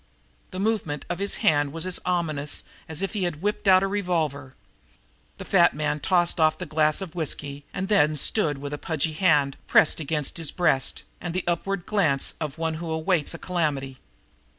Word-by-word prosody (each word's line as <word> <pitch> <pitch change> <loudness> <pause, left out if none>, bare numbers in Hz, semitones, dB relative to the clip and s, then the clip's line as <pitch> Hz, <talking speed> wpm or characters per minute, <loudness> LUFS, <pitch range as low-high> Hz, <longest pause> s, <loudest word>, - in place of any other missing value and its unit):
The 185 - -7
movement 200 -8 -1
of 175 - -3
his 200 0 -1
hand 145 -2 +3
was 165 +2 -2
as 185 -1 0
ominous 155 -5 0 0.3
as 160 +3 -2
if 195 - -2
he 200 -4 -1
had 170 -1 -4
whipped 210 0 -1
out 185 0 +6
a - - +1
revolver. 160 -9 -2 0.8
The - - -8
fat - - +4
man 150 0 -1
tossed 175 +1 +2
off 155 -1 +3
the - - -5
glass 155 +2 +2
of 185 -4 -6
whisky 145 -4 -4
and 190 0 -3
then 155 -7 +3
stood 150 -1 +2
with 145 +1 -6
a 145 - -4
pudgy 160 -1 -2
hand 150 -5 +2
pressed 155 - +4
against 150 -1 -2
his 165 -3 +1
breast 135 -8 0 0.2
and 175 0 -5
the 185 - -1
upward 175 +2 -2
glance 160 -10 +1
of 150 -2 -4
one 160 0 -1
who 170 - -5
awaits 160 0 0
a - - -6
calamity. 145 -7 -2
160 Hz, 190 wpm, -25 LUFS, 145-185 Hz, 0.8 s, out